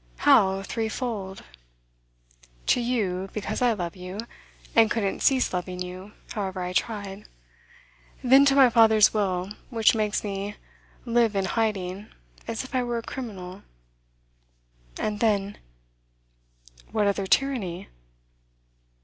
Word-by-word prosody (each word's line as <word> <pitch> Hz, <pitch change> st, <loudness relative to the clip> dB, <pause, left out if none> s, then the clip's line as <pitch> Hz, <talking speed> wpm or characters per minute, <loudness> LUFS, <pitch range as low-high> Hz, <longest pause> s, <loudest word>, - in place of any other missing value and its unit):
'How 190 Hz, -, +4 dB
threefold?' 220 Hz, -3 st, -4 dB, 1.2 s
'To 245 Hz, -, +3 dB
you, 195 Hz, -6 st, -1 dB
because 210 Hz, +1 st, -3 dB
I 245 Hz, -2 st, +4 dB
love 175 Hz, -5 st, -4 dB
you, 180 Hz, +1 st, -8 dB, 0.6 s
and 225 Hz, -1 st, +6 dB
couldn't 210 Hz, -4 st, -1 dB
cease 265 Hz, -6 st, +2 dB
loving 180 Hz, 0 st, -3 dB
you, 185 Hz, +3 st, -7 dB, 0.2 s
however 190 Hz, -4 st, -3 dB
I 180 Hz, 0 st, -4 dB
tried. 200 Hz, -1 st, -3 dB, 1.0 s
Then, 265 Hz, +2 st, +7 dB
to 275 Hz, -1 st, +4 dB
my 265 Hz, -3 st, +7 dB
father's 220 Hz, -2 st, +6 dB
will, 190 Hz, -3 st, -1 dB, 0.2 s
which 225 Hz, -3 st, +4 dB
makes 215 Hz, -2 st, 0 dB
me 200 Hz, 0 st, -4 dB, 0.5 s
live 235 Hz, -3 st, +2 dB
in 195 Hz, -1 st, +1 dB
hiding, 200 Hz, -2 st, -2 dB, 0.4 s
as 230 Hz, -, -3 dB
if 260 Hz, -, -12 dB
I 255 Hz, -, +2 dB
were 240 Hz, -1 st, -2 dB
a 230 Hz, -, -4 dB
criminal. 195 Hz, -8 st, -7 dB, 1.4 s
And 210 Hz, -1 st, -2 dB
then 205 Hz, -2 st, 0 dB, 0.6 s
' -, -, -28 dB
'What 215 Hz, -1 st, +1 dB
other 200 Hz, -1 st, 0 dB
tyranny? 205 Hz, -9 st, 0 dB
205 Hz, 125 wpm, -26 LUFS, 185-230 Hz, 1.4 s, Then